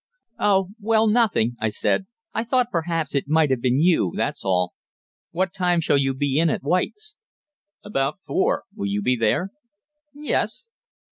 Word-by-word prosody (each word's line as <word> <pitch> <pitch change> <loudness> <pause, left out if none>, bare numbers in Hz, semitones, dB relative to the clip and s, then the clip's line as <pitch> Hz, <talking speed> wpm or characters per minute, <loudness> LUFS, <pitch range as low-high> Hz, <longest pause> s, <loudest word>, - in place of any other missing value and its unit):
"Oh 195 -2 +2
well, 220 +1 +2
nothing," 210 - +2
I 110 - 0
said. 190 - 0 0.3
"I 225 - -1
thought 245 0 +1
perhaps 165 -1 -1
it 140 -1 -1
might 155 -1 +3
have 130 -3 0
been 130 +1 +2
you 160 - +3
that's - - -2
all. 90 -2 +1 0.6
What 185 +1 -1
time 180 -2 +1
shall 145 -3 +2
you 135 -1 0
be 140 +1 0
in 165 0 +3
at - - -2
White's?" 420 - -1 0.7
"About 135 -7 -1
four. - - +1
Will 100 - -3
you 100 +1 -1
be 125 +3 +2
there?" 115 - 0 0.6
"Yes." 300 +9 -2
165 Hz, 160 wpm, -23 LUFS, 130-200 Hz, 0.7 s, might